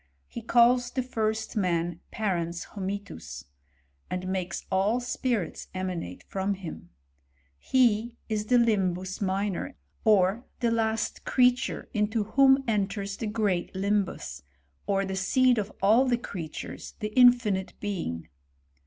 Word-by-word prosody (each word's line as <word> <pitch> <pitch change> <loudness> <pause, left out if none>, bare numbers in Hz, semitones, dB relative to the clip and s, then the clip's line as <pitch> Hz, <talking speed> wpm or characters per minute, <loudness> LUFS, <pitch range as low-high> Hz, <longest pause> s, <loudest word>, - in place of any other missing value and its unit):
He 235 - -7
calls 240 +2 +4
the 255 +1 -2
first 220 -3 -2
man 175 -4 0
parens 175 -5 -2
hominis; 200 - -6 0.6
and 180 0 -3
makes 185 -2 -3
all 200 +5 +2
spirits 240 -6 -2
emanate 180 - -4
from 195 +1 -1
him. 165 - -8 0.7
He 235 - +2
is 215 -1 -2
the 250 - +4
limhus 190 -5 +1
minor 195 -1 -1
y - - -13 0.3
or 210 +2 +3
the 235 -2 +1
last 225 -1 -1
crea« 250 -1 +5
ture, 260 - -5
into 215 0 +1
whom 270 +5 +4
enters 200 -2 -1
the 225 - -3
great 205 -5 -1
limbus, 190 - -1 0.5
or 195 0 +1
the 190 0 -3
seed. 250 +5 +3
of 210 0 -3
all 225 +6 +5
the 245 -2 +2
creatures, 170 -9 -7
the 210 -1 -4
infinite 240 -7 +4
being. 170 - -4
205 Hz, 130 wpm, -27 LUFS, 190-235 Hz, 0.7 s, crea